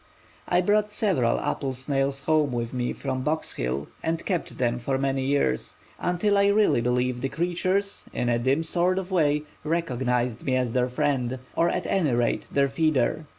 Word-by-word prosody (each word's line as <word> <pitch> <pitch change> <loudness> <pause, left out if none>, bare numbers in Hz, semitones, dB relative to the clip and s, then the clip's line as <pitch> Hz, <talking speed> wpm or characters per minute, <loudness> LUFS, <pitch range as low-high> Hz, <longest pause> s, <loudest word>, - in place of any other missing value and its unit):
I 180 0 +3
brought 210 +3 +2
several 190 - +1
apple 135 -2 -2
snails 135 +1 -1
home 155 -3 +2
with 120 0 -3
me 125 -1 -1
from 130 -2 -3
Box 155 +4 -1
Hill 65 +4 -3
and 165 0 -2
kept 180 -4 -2
them 120 -1 0
for 130 +2 -1
many 135 0 0
years, 140 - 0 0.2
until 200 +3 +1
I 200 - +4
really 200 - +3
believe 125 +1 0
the 135 - -1
creatures, 185 +4 -1
in 125 - -2
a 120 -1 +2
dim 135 +6 +1
sort 175 +3 +1
of 190 0 -4
way, 150 -4 +2 0.2
recognized 125 -7 -1
me 130 - 0
as 125 -3 0
their 125 0 +1
friend, 130 -2 0 0.2
or 170 - +3
at - - -2
any 160 -9 +1
rate 120 -1 0
their 140 0 +3
feeder. 155 +1 +1
140 Hz, 180 wpm, -26 LUFS, 125-170 Hz, 0.2 s, I